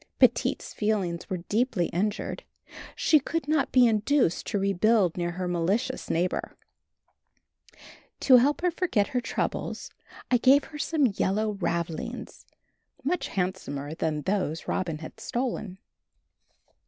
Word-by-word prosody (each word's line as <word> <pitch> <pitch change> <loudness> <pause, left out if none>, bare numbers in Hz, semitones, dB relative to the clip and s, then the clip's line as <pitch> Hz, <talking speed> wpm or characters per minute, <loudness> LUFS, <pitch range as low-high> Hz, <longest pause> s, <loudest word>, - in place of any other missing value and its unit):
Petite's - - +2
feelings 195 -6 -1
were 180 -3 -3
deeply 220 -5 +1
injured 205 +4 -2 0.5
she 310 - +4
could 325 +3 -3
not 305 -2 +1
be 255 -1 +6
induced 225 - +2
to 210 - -1
rebuild 195 -1 +2
near 175 -1 -2
her 180 0 -3
malicious 195 +10 -1
neighbor. 175 +2 -1 1.6
To 260 -2 +7
help 280 +6 +2
her 360 0 +2
forget 330 - 0
her 250 - -1
troubles 230 - -3 0.4
I 250 - +6
gave 270 +4 +5
her 300 -2 -10
some 295 0 +1
yellow 210 0 0
ravelings, 170 -4 -4 0.6
much 330 +6 -1
handsomer 170 -6 -3
than 155 -2 -2
those 185 -4 -1
Robin 170 -5 -1
had 155 0 -10
stolen. 235 -6 -3
205 Hz, 125 wpm, -27 LUFS, 175-255 Hz, 1.6 s, To